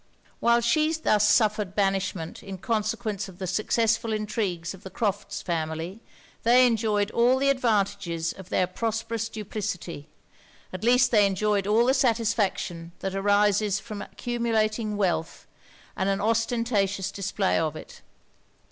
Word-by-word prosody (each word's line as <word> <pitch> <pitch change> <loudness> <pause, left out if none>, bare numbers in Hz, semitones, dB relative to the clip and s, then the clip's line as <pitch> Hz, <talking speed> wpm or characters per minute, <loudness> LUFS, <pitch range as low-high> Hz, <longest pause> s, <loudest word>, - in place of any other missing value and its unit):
While 235 0 +3
she 305 +7 +2
thus 215 -10 +2
suffered 210 -4 +2
banishment 195 -4 -1
in 195 -1 -7
consequence 215 -2 -2
of 180 - -14
the 190 - -4
successful 220 +4 +1
intrigues 205 -6 -2
of 190 - -13
the 190 - -9
Crofts' 205 0 -3
family, 165 +4 -3 0.4
they 245 +2 +6
enjoyed 215 -3 +1
all 245 +2 +3
the 275 +1 +2
advantages 200 -9 0
of 190 -1 -12
their 185 - +2
prosperous 225 +3 -3
duplicity; 200 -8 -5 0.7
at 185 - -6
least 245 +2 +4
they 210 -4 +5
enjoyed 200 0 0
all 220 +3 +4
the 260 - +4
satisfaction 220 - 0
that 190 0 -3
arises 205 0 +2
from 205 0 -7
accumulating 225 -3 -1
wealth 170 -5 -1 0.5
and 190 - 0
an 195 0 0
ostentatious 220 -3 0
display 195 0 0
of 160 -1 -1
it. - - -11
210 Hz, 135 wpm, -26 LUFS, 190-230 Hz, 0.7 s, they